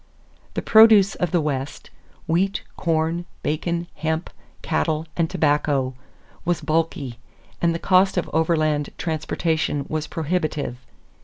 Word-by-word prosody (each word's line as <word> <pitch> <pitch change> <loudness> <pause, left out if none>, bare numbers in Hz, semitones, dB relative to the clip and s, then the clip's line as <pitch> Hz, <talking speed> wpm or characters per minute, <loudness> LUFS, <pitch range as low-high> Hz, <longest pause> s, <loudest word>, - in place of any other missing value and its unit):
The - - -2
produce 220 -3 +7
of 180 - -1
the 175 +1 +2
West 140 -2 -4 0.3
wheat, 190 +4 0
corn, 165 +1 0 0.2
bacon, 170 +3 -1
hemp, 160 +1 -2 0.3
cattle, 160 -1 0
and 165 -2 +1
tobacco 145 -3 +1 0.5
was 175 -1 0
bulky 155 -6 -1 0.4
and 170 -1 +2
the - - 0
cost 185 +2 +3
of 180 - 0
overland 155 -2 +1
transportation 160 -2 -1
was 155 -1 -3
prohibitive. 155 -5 -2
160 Hz, 115 wpm, -23 LUFS, 150-175 Hz, 0.5 s, produce